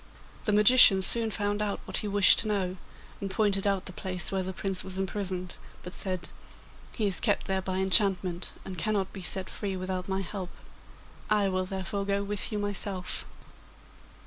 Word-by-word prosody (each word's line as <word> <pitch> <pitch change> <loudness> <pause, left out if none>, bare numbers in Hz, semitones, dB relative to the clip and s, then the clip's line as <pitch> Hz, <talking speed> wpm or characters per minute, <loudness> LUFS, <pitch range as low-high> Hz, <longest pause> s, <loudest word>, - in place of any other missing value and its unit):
The 215 - +1
magician 210 -2 +7
soon 230 +3 +4
found 205 0 -2
out 205 -1 -2
what - - -3
he 210 - -1
wished 200 -1 +5
to 220 - -1
know, 190 -3 -2 0.4
and 200 - -4
pointed 200 0 0
out 195 -2 0
the 185 - -8
place 185 -2 -1
where 190 -1 -1
the 185 0 -4
Prince 190 0 -3
was 190 0 -5
imprisoned, 190 -2 -4 0.3
but 180 - -8
said: 185 -3 -3 0.7
'He 220 - -1
is 195 -2 +2
kept 205 -4 0
there 190 -1 -1
by 185 0 -3
enchantment, 190 -2 +3
and 185 -3 -7
cannot 200 +1 -1
be 195 - -8
set 185 +2 -1
free 195 -2 -5
without 185 0 -4
my 190 0 -1
help. 190 -1 -6 0.8
I 210 -2 +2
will 185 0 -1
therefore 195 +1 -4
go 200 0 0
with 205 +2 -1
you 210 - -2
myself. 200 -2 -3
195 Hz, 180 wpm, -28 LUFS, 185-205 Hz, 0.8 s, magician